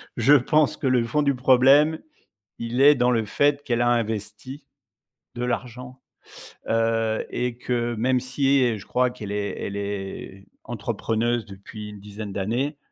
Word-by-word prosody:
je 120 +4 +2
je - - +10
pense 155 +3 +2
que 140 - -2
le 125 -2 +3
fond 150 +6 0
du 140 -2 +1
problème, 135 +5 +4 0.6
il 115 +2 -3
est 145 +1 +7
dans 125 0 +2
le 115 -2 +1
fait 145 +6 +1
qu'elle 120 -4 0
a 120 - +2
investi 115 +3 -3 0.7
de 120 0 -3
l'argent, 125 +1 -5 0.7
heu, 115 -1 0
et 125 -1 -3
que 120 -1 -1
même 125 +3 +1
si 135 +2 +1
et 115 -4 0
je 95 - -14
crois 125 0 +1
qu'elle 110 -5 -8
est 105 0 -3
elle 100 - -5
est 100 -1 -6 0.2
entrepreneuse 115 0 -2
depuis 105 +1 -10
une 105 -1 -11
dizaine 105 0 -8
d'années. 120 +10 -2
120 Hz, 165 wpm, -24 LUFS, 110-130 Hz, 0.7 s, je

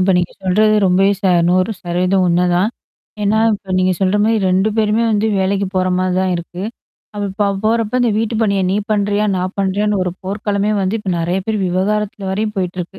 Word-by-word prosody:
இப்ப 185 +1 +3
நீங்க 175 - -2
சொல்றது 215 +3 +3
ரொம்பவே 195 +2 +3
ச - - -42 0.3
100% 185 -1 0
உண்மதான் 180 +4 +2 0.5
ஏன்னா, 205 +2 +2 0.2
இப்ப 195 -2 -7
நீங்க 185 0 +2
சொல்ற 190 +1 +2
மாரி 225 +1 +2
2 190 +3 +2
பேருமே 215 +1 +2
வந்து 215 +1 +1
வேலைக்கு 195 +1 0
போற 185 0 +1
மாரி 185 0 0
தான் 185 -1 0
இருக்கு.அவ 180 +6 -7 0.5
இப்ப 205 +2 -2
அவ 200 - -1
போறப்ப 230 +2 +1
இந்த 240 - +2
வீட்டு 225 +1 -1
பணியா 200 -3 +1
நீ 195 - +1 0.2
பண்றியா? 205 0 +1
நான் 185 +1 -3
பண்றியான்னு? 200 +1 0
ஒரு 180 - -2
போர்க்காலமே 205 +1 -1
வந்து 195 +3 0
இப்ப 195 -3 -3
நெறைய 175 +3 -1
பேர் 220 -1 -1
விவாகரத்துல 195 +2 -1
வரையும் 210 +2 -2
போயிட்டுருக்கு. 180 0 -4
195 Hz, 180 wpm, -17 LUFS, 185-210 Hz, 0.5 s, இப்ப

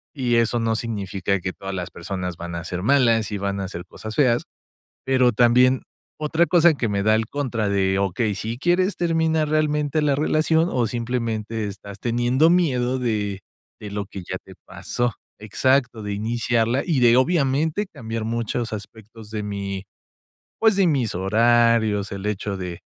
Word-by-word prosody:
Y 125 -4 0
eso 115 +1 +2
no 115 -1 0
significa 100 -4 -2
que 90 0 -4
todas 95 0 -7
las 90 -1 -5
personas 90 -1 -5
van 85 0 -6
a 85 - -4
ser 90 +1 -4
malas 115 -3 +3
y 105 - -2
van 100 0 -2
a 95 - -2
hacer 90 -2 -7
cosas 110 0 -9
feas, 125 -5 +3 0.6
pero 130 -2 +3
también 125 +3 +4 0.4
otra 160 +3 +2
cosa 170 -1 +5
que 125 -6 -2
me 100 -1 -1
da 110 +1 +4
el 110 0 0
contra 120 -7 -2
de: 95 -1 +1
"Okey, 100 +2 0
si 110 +4 -4
quieres 175 +6 +1
terminar 160 -2 +1
realmente 150 -1 +1
la 145 -2 +2
relación, 155 +3 +2
o 120 -2 +1
simplemente 115 -2 -3
estás 100 0 -9
teniendo 120 +6 +2
miedo 130 -8 +2
de 105 -5 -2 0.4
de 105 -1 -8
lo 100 0 -3
que 95 0 -8
ya - - -3
te - - -13
pasó". 120 -1 -2 0.3
Exacto, 125 +2 +1
de 105 -1 -4
iniciarla 115 +3 0
y 160 -6 +1
de 120 -1 +5
obviamente, 150 +5 +1
cambiar 115 - -6
muchos 115 0 -2
aspectos 110 +1 -10
de 105 -1 -4
mi, 100 -1 -4 0.8
pues, 220 -2 +4
de 195 -1 +3
mis 135 - +1
horarios, 110 +1 +2
el 100 0 -6
hecho 105 -1 -2
de 90 -2 -6
115 Hz, 170 wpm, -23 LUFS, 100-130 Hz, 0.8 s, cosa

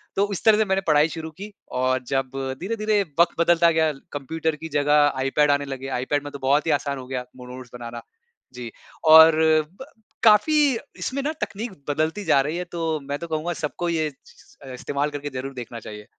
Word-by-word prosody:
तो 200 +1 +1
इस 190 - -4
तरह 220 -1 +6
से 220 - +2
मैंने 190 0 0
पढ़ाई 150 0 +4
शुरू 160 0 -6
की। 200 +6 -10 0.2
और 130 0 0
जब 135 -1 -1 0.3
धीरे-धीरे 215 +1 0 0.2
वक़्त 170 -1 +3
बदलता 170 0 +4
गया 160 -1 +2 0.2
कंप्यूटर 160 +3 -2
की 160 +2 -8
जगह 145 0 +3
iPad 145 +2 +2
आने 145 0 +1
लगे, 135 -1 -6 0.2
iPad 145 +1 -1
में 145 - -7
तो 140 - -8
बहुत 140 +4 +2
ही - - +3
आसान 140 -1 -4
हो 130 - -8
गया 130 -1 -3
मो 125 - -10
नोट्स 130 -1 -10
बनाना। 120 -1 -7 0.5
जी। 120 -2 -7 0.3
और 160 0 +9 0.5
ब - - -6 0.4
काफ़ी 220 +8 +5 0.4
इसमें 275 +1 -3
ना 305 - 0
तकनीक 220 +2 -4 0.2
बदलती 160 +7 -1
जा 150 -4 +4
रही 150 +5 -3
है 180 - -2
तो 165 -2 -2
मैं 140 +1 -4
तो 170 - -6
कहूँगा 160 +2 -2
सबको 170 +2 -3
ये 160 -2 0
चीज़ 130 - -22
अ, 130 - -7
इस्तेमाल 140 +3 -2
करके 145 0 -5
ज़रूर 130 +1 -5
देखना 120 -2 -7
चाहिए। 105 -1 -10
150 Hz, 205 wpm, -23 LUFS, 135-170 Hz, 0.5 s, और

